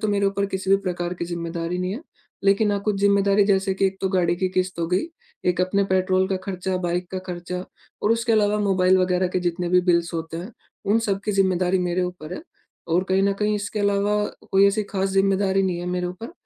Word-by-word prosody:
तो 215 - -1
मेरे 200 -1 +2
ऊपर 200 0 0
किसी 190 -1 -3
भी 195 - +7
प्रकार 175 -1 -3
की 170 - -4
जिम्मेदारी 170 0 -4
नहीं 180 +1 -2
है। 240 - -6 0.4
लेकिन 200 +2 +3
हाँ 200 - -1
कुछ 210 -1 0
जिम्मेदारी 200 0 +4
जैसे 195 -1 +2
कि 195 - 0
एक 190 0 -3
तो 190 - 0
गाड़ी 180 -2 +1
की 185 +1 0
किश्त 185 -1 -2
हो 165 - 0
गई, 185 - +1 0.4
एक 180 0 +1
अपने 195 +2 +2
पेट्रोल 185 0 +2
का 190 - 0
खर्चा, 185 -1 -2
बाइक 175 0 -2
का 190 - -3
खर्चा 180 +1 -5 0.4
और 210 - +2
उसके 230 0 0
अलावा 210 -1 +3
मोबाइल 190 -2 +3
वग़ैरह 180 0 +1
के 185 0 -1
जितने 175 0 -1
भी 180 0 +4
बिल्स 170 -1 +1
होते 165 0 -4
हैं 180 +6 -6 0.4
उन 225 - +4
सब 195 0 0
की 210 - 0
जिम्मेदारी 185 -1 +2
मेरे 180 0 0
ऊपर 180 -2 -5
है। - - -7 0.5
और 175 +3 +2
कहीं 190 +1 +2
न 200 0 +3
कहीं 210 0 +2
इसके 205 +1 -4
अलावा 205 +1 +1 0.3
कोई 195 +1 +5
ऐसी 210 +2 +1
ख़ास 195 -1 -2
जिम्मेदारी 195 0 +2
नहीं 180 -2 -1
है 175 - -5
मेरे 180 0 -1
ऊपर। 205 - -7
190 Hz, 230 wpm, -23 LUFS, 180-200 Hz, 0.5 s, भी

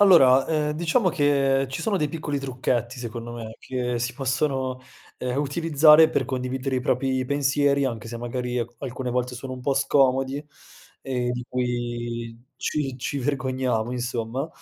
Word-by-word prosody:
Allora, 135 -10 +7
ehm, 150 -2 0
diciamo 170 +7 +2
che 140 -4 +2
ci 135 - -4
sono 220 -3 +1
dei 150 -5 0
piccoli 150 -3 -3
trucchetti 130 -2 -2
secondo 120 0 -6
me 115 -2 -7
che 125 -2 -2
si 120 +1 -2
possono, 130 -1 -1 0.4
ehm, 125 +1 -2
utilizzare 155 +1 +6
per - - +1
condividere 130 0 -2
i - - 0
propri 130 +1 0
pensieri, 140 +1 +2
anche 115 -4 -3
se 115 +1 -6
magari 125 +1 -3
al 120 -1 -2
alcune 125 0 -4
volte 125 0 -1
sono 130 +2 -6
un 130 - -9
po' 135 +2 0
scomodi 135 0 +2 0.6
e 125 -2 -2
di 125 0 -4
cui 120 -2 -3 0.2
ci 135 -4 -2
ci 140 +3 -3
vergogniamo, 130 -4 -1
insomma. 125 +2 -3
130 Hz, 155 wpm, -25 LUFS, 125-140 Hz, 0.6 s, Allora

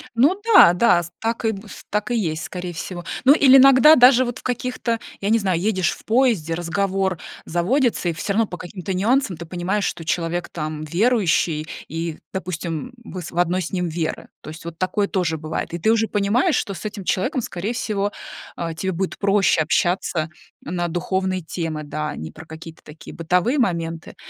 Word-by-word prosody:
Ну 295 - +3
да, 175 - +9
да, 180 -2 +4
с 170 - -9
так 230 +1 -2
и, 220 -1 +1
с - - -11
так 210 +3 -1
и 240 - +1
есть, 165 -6 -2
скорее 180 -1 -5
всего. 175 +1 -6 0.2
Ну 275 +3 +8
или 270 -3 +7
иногда 270 +3 +8
даже 255 -2 +6
вот 240 0 -4
в - - -14
каких-то, 250 -2 -2 0.2
я 200 +2 -1
не 230 - +4
знаю, 185 -5 0
едешь 190 -3 +1
в - - -11
поезде, 220 - +2
разговор 190 +1 -1 0.3
заводится, 210 - +1
и 170 - +1
всё 165 +5 -3
равно 225 +2 +2
по 180 - -7
каким-то 185 +2 -6
нюансам 210 - +1
ты 170 - -8
понимаешь, 185 +4 -2
что 165 - -3
человек 170 +1 -2
там, 155 -1 -5
м, - - -5
верующий 170 -4 +1 0.2
и, 165 0 -4
допустим, 175 0 -4 0.2
м, - - -11
вы 185 -1 -5
с - - -7
в 170 - -6
одной 180 +1 +2
с 170 - -5
ним 180 -2 -1
веры. 160 0 -3
То - - -9
есть 155 +2 -11
вот 170 -1 -8
такое 200 +2 0
тоже 175 -4 0
бывает. 155 +1 -4
И - - -2
ты 220 - +2
уже 225 -1 +1
понимаешь, 220 - +2
что 200 -3 -2
с - - -9
этим 205 -2 -5
человеком, 255 - 0
скорее 205 0 -4
всего, 205 -3 -2 0.4
а, 165 -1 -4
тебе 190 +3 -2
будет 185 +2 -3
проще 195 -4 +3
общаться, 170 -1 0 0.4
м, 180 - -4
на 175 -1 -1
духовные 185 +2 -1
темы, 160 -2 -4
да, 150 +1 -4
а - - -7
не 80 - -6
про 160 +1 -12
какие-то 160 0 -11
такие 150 +1 -12
бытовые 180 - +1
моменты. 165 -7 -2
185 Hz, 205 wpm, -22 LUFS, 165-220 Hz, 0.4 s, да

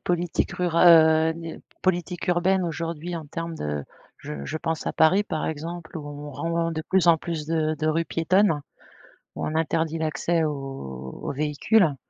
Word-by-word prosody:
politiques 175 -1 -1
rura 175 -1 +3
heu, 160 -1 +7
n 165 -1 -8 0.2
politiques 180 -1 -1
urbaines 180 +2 +2
aujourd'hui 170 0 -4
en 160 -3 -6
termes 165 +3 -5
de 75 - -3 0.3
je 70 -2 -7
je 155 - -3
pense 160 -1 -3
à - - 0
Paris 185 +6 +4
par 160 -6 -3
exemple. 165 +2 -5
Où 145 - -8
on 145 0 -7
rend 165 +3 -1
de 160 0 -3
plus 185 +1 +2
en 165 - +7
plus 155 -2 -4
de 155 -1 0
de 155 +1 -3
rues 165 +2 +1
piétonnes, 165 -1 +2 0.8
où - - -3
on 155 - -3
interdit 160 0 0
l'accès 160 +1 0
aux 135 - -5
aux - - -3
véhicules. 150 - +2
160 Hz, 175 wpm, -25 LUFS, 155-170 Hz, 0.8 s, heu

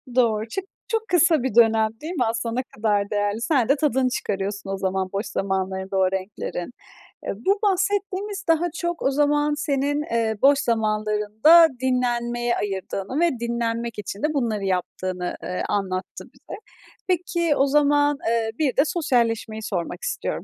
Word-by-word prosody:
Doğru. 225 -3 +2
Çık 385 - -4 0.2
çok 450 -1 -2
kısa 335 -5 +4
bir 260 -5 -2
dönem, 225 -2 +5
değil 320 +4 -5
mi? 305 - +1
Aslında 230 +1 -2
ne 255 - 0
kadar 205 -2 0
değerli? 205 +1 -1
Sen 245 -1 +1
de 275 - +5
tadını 265 -3 +1
çıkarıyorsun 200 -3 -3
o 195 - -2
zaman 190 0 -1
boş 200 +3 -2
zamanlarında 190 0 -2
o 185 -1 +3
renklerin. 190 0 -4 0.5
Eee, - - -3
bu 390 - 0
bahsettiğimiz 400 +1 0
daha 330 +1 +3
çok 345 -1 -3
o 270 - +2
zaman 295 +1 +2
senin, 290 0 0
eee, 225 -1 +1
boş 280 +1 +5
zamanlarında 215 +7 +4
dinlenmeye 240 -2 0
ayırdığını 195 +5 -3
ve 345 0 +4
dinlenmek 235 -1 -2
için 200 0 -6
de 305 0 +1
bunları 230 -7 -1
yaptığını, 185 -1 -2
eee, 180 - -3
anlattı 185 -2 -3
bize. - - -10 0.5
Peki 345 -3 +1
o 275 - +3
zaman, 290 0 +3
eee, 225 -1 0
bir 280 -5 0
de - - +7
sosyalleşmeyi 235 - 0
sormak 195 - -4
istiyorum. - - -3
235 Hz, 155 wpm, -23 LUFS, 205-295 Hz, 0.5 s, de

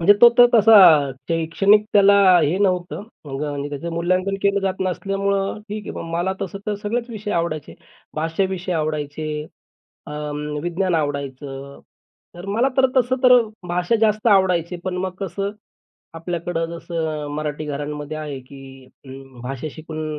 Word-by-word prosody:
म्हणजे 185 +5 +7
तो 240 - +10
तर 245 - +10
तसा 225 0 +7 0.5
शैक्षणिक 180 +6 +3
त्याला 200 -1 +6 0.3
हे 155 +4 +1
नव्हतं. 185 -1 0 0.2
मग 135 0 -5
आणि 145 0 -4
त्याचं 145 +4 -5
मूल्यांकन 185 +3 0
केलं 200 0 +2
जात 190 -1 -2
नसल्यामुळं 195 +2 -1
ठीक 210 0 -6
आहे. - - -5
मग 165 - -7
मला 175 +3 0
तसं 195 +1 -5
तर 210 - 0
सगळेच 235 +3 -2
विषय 210 -1 -6
आवडायचे. 165 -3 -2 0.4
भाष्य 165 +5 0
विषय 185 -1 -4
आवडायचे, 155 -1 -3 0.6
अ, - - -9 0.5
विज्ञान 175 +1 -1
आवडायचं. 140 -2 -4 0.5
तर 175 +3 -10
मला 230 +6 +2
तर 265 -1 +5
तसं 255 0 +3
तर 250 -1 +7 0.3
भाषा 180 +6 +1
जास्त 215 0 +1
आवडायचे 185 -4 +3
पण 185 -1 -3
मग 185 0 -2
कसं, 195 +1 -3 0.6
आपल्याकडं 165 0 -3
जसं 160 -3 -4
मराठी 150 0 -4
घरांमध्ये 150 +1 -5
आहे 150 -3 -5
की 135 0 -13 0.2
अं, 135 -2 -12
भाषा 135 +4 -5
शिकून 155 0 -6
170 Hz, 150 wpm, -21 LUFS, 150-195 Hz, 0.6 s, तो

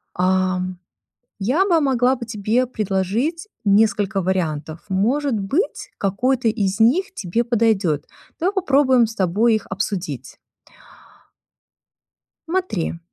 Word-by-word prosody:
Ам, 185 0 0 0.6
я 260 - +2
бы 345 -5 +3
могла 260 -2 +2
бы 240 -2 -7
тебе 220 +3 0
предложить 225 - -2 0.2
несколько 205 -1 +2
вариантов. 160 -4 -2
Может 235 +6 +1
быть, 410 - -2
какой-то 240 +5 0
из 205 -2 0
них 360 - +3
тебе 215 - -1
подойдет. 215 - +1 0.3
Давай 375 +5 +1
попробуем 270 - +3
с 220 - -9
тобой 210 +5 +2
их 215 - -3
обсудить. 185 - -4 2.1
Смотри, 325 - -2
220 Hz, 105 wpm, -21 LUFS, 190-265 Hz, 2.1 s, бы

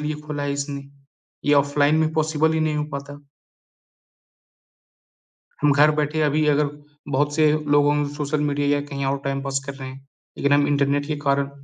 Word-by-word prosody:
लिए 150 0 -2
खोला 150 -1 -4
है 145 0 -1
इसने, 140 0 -4 0.6
ये 145 - +4
ऑफ़लाइन 145 +1 +3
में 160 0 +1
पॉसिबल 155 0 +1
ही 160 - 0
नहीं 155 -1 0
हो 150 - -1
पाता। 140 +1 -7 2.4
हम 150 -1 +5
घर 145 +2 +5
बैठे 150 +1 -1
अभी 150 +1 +2
अगर 150 0 +2 0.4
बहुत 145 +2 +1
से 155 0 +4 0.3
लोगों 145 0 +4 0.2
सोशल 145 0 -2
मीडिया 145 0 0
या - - -1
कहीं 140 -1 -4
और 140 +1 0
टाइम 135 0 -2
पास 135 0 -2
कर 140 - -5
रहे 135 -1 -8
हैं, 135 +1 -12 0.3
लेकिन 140 - +1
हम 145 0 +4
इंटरनेट 145 0 +1
के 155 0 -2
कारण 140 0 +1
145 Hz, 180 wpm, -22 LUFS, 140-150 Hz, 2.4 s, हम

